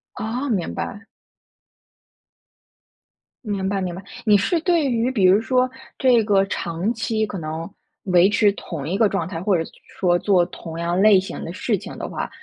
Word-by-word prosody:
哦， 240 +6 -3
明 190 -7 -1
白。 210 +2 -5 2.4
明 200 -3 -2
白， 195 0 -1
明 180 -2 -3
白。 180 - -7 0.2
你 210 -1 +6
是 330 - +1
对 335 -4 +2
于 240 +1 +1
比 200 -7 +2
如 195 +4 +5
说 255 +2 +1 0.3
这 245 -4 +4
个 200 -2 +3
长 175 +2 -2
期 220 -1 -1
可 205 - -6
能 160 +1 -5 0.3
维 180 0 +4
持 210 0 +3
同 160 -7 -6
一 185 +4 -1
个 220 -2 +4
状 185 -5 -2
态， 170 -3 -5
或 195 -2 +2
者 165 - -3 0.3
说 175 -2 +3
做 180 -1 +3
同 165 -2 -8
样 170 +2 -1
类 205 -2 +7
型 190 - -6
的 165 - -5
事 210 +2 -1
情 - - -9
的 - - -5
话， - - -4
195 Hz, 195 characters per minute, -22 LUFS, 175-220 Hz, 2.4 s, 类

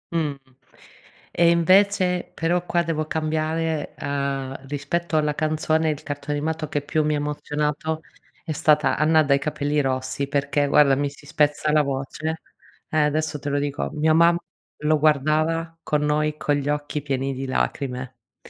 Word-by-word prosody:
Mh. 155 -3 0 1.0
E 170 0 +4
invece 185 +1 +3
però 175 +2 0
qua 175 -1 +1
devo 155 -2 -2
cambiare, 160 0 -1
uhm, 135 -1 -3
rispetto 145 +4 -2
alla 150 -1 +2
canzone, 155 +1 +1
il 150 -2 -3
cartone 145 0 -4
animato 155 +1 -2
che 145 - -2
più 155 +2 0
mi 150 - +1
ha - - 0
emozionato 150 +2 -2 0.4
è - - -4
stata 150 0 +3
Anna 155 +1 +4
dai 140 -1 +3
capelli 150 0 -1
rossi, 130 0 -1
perché 145 0 0
guarda, 140 -1 +5
mi 145 +1 0
si 145 +1 -16
spezza 150 +1 +1
la 155 0 +5
voce 140 +4 -3 0.5
eh, 155 - -1
adesso 150 0 +1
te 140 - -7
lo 145 - +1
dico: 145 0 -2
mia 155 +1 +2
mamma 170 +1 +5 0.4
lo 155 0 +3
guardava 155 +3 +1
con 150 -1 0
noi 150 0 +1
con 145 - +1
gli 145 0 -3
occhi 150 0 -2
pieni 135 -1 -1
di 135 +1 -4
lacrime 130 -1 -2 0.3
mi - - -15
150 Hz, 160 wpm, -23 LUFS, 145-160 Hz, 1.0 s, guarda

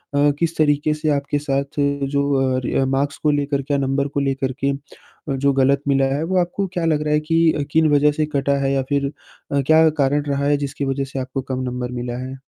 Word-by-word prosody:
अ, 145 +1 +4
किस 165 -1 -1
तरीक़े 150 0 +2
से 155 0 -2
आपके 145 0 0
साथ 140 0 -2 0.3
जो 140 -2 +1
रि - - -2
अ, 135 - +2
मार्क्स 135 +2 -1
को 150 - +4
लेकर 145 -1 0
के 145 +2 -3
या - - +3
नंबर 135 +1 0
को 140 - -3
लेकर 135 -1 -1
के 140 - +3
अ, - - -4 0.6
जो 140 +1 +2
ग़लत 135 +1 +3
मिला 135 0 +3
है 150 - -1
वो 185 +2 0
आपको 180 +3 -2
क्या 175 - -2
लग 155 -2 +1
रहा 150 - +1
है 150 - +3
कि, 160 -2 +2
किन 160 0 +4
वजह 145 +1 +4
से 155 +1 0
कटा 140 0 +1
है 135 0 +1
या 135 - +1
फिर 140 -1 +1 0.5
अ, 140 -1 +2
क्या 160 0 +6
कारण 145 +2 +2
रहा 140 0 0
है 145 0 +3
जिसकी 140 +1 -4
वजह 135 0 -1
से 135 - -2
आपको 130 +1 -4
कम 130 - -2
नंबर 125 0 -4
मिला 120 0 -4
है? 130 - -7
140 Hz, 240 wpm, -21 LUFS, 135-150 Hz, 0.6 s, क्या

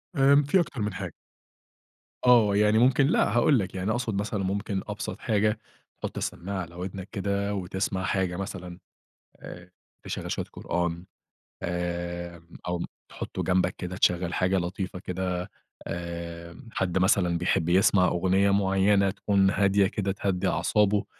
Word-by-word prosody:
آمم، 140 +1 +5
في 145 +7 +3
أكتر 140 -8 -2
من 105 -1 -1
حاجة. 90 -4 -5 1.1
آه، 115 -5 +6
يعني 105 +1 +4
ممكن، 130 +3 +4
لأ، - - +2
هاقول 130 +2 +4
لك 95 -2 -4
يعني 95 +3 -1
أقصد 120 -2 -1
مثلًا، 100 0 -2
ممكن 100 0 -2
أبسط - - -5
حاجة، 105 +1 +1 0.4
تحط - - -5
السماعة 95 +2 -3
على 85 -1 -9
وِدْنَك 95 +2 -6
كده 100 +1 -1
وتسمع 95 0 -2
حاجة 95 -2 0
مثلًا، 90 -2 -6 0.6
آآ، 90 +1 -10 0.3
تشغل - - -5
شوية - - -2
قرآن، 85 0 -2 0.6
آآ 85 0 -3 0.3
أو 90 -1 -1 0.3
تحطه - - -5
جنبك 95 0 +1
كده 90 +1 -5
تشغل 90 -2 +2
حاجة 95 +1 +2
لطيفة 90 +2 -3
كده، 90 0 -3 0.4
آآ 85 0 -6
حد 95 -3 -1
مثلًا 95 -3 +3
بيحب 85 -1 +1
يسمع 90 +1 +4
أغنية 95 +3 +2
مُعينة 100 0 +3
تكون 100 0 +2
هادية 100 0 +3
كده 100 0 -2
تهدي 95 -1 -1
أعصابه. 100 +4 +2
95 Hz, 140 wpm, -27 LUFS, 90-100 Hz, 1.1 s, آه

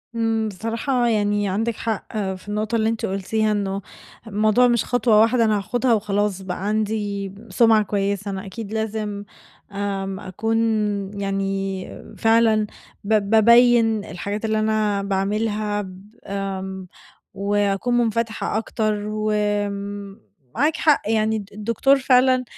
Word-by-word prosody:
إمم، 225 -1 0
بصراحة 230 +5 -1
يعني 205 -2 +1
عندِك 225 +4 -1
حق 220 -1 -4 0.2
في 185 +1 -12
النقطة 215 +2 -2
اللي 220 -1 +2
أنتِ 225 0 -2
قلتيها، 215 +3 0
إنه 200 -1 -1 0.5
الموضوع 215 +3 +3
مش 240 -2 +1
خطوة 230 -3 +3
واحدة 230 +1 +3
أنا 215 -1 +2
هاخدها 245 +5 0
وخلاص 205 -2 0
بقى 190 0 -5
عندي 205 -2 -1 0.2
سمعة 220 +2 +4
كويسة، 200 0 -2
أنا 195 0 -5
أكيد 205 +2 -7
لازم 215 -2 -3 0.5
آمم، 195 -1 -3
أكون 215 +3 -2 0.6
يعني 195 -1 -3
فعلًا 225 -1 +3 0.4
ب 205 -1 +1
بابيّن 230 -1 +5
الحاجات 200 +4 -4
اللي 220 0 +1
أنا 215 -2 +1
باعملها 205 +2 -1
ب 190 +1 -11 0.2
آمم، 190 -1 -4 0.5
وأكون 200 +4 0
منفتحة 225 -1 0
أكتر، 220 -1 -1
وم 205 - -2 0.3
معاكِ 295 +6 +2
حق 300 -3 +3
يعني، 220 0 +1
الد 200 -2 -8
الدكتور 230 +6 +2
فعلًا 255 -1 +4
210 Hz, 125 wpm, -22 LUFS, 200-225 Hz, 0.6 s, بابيّن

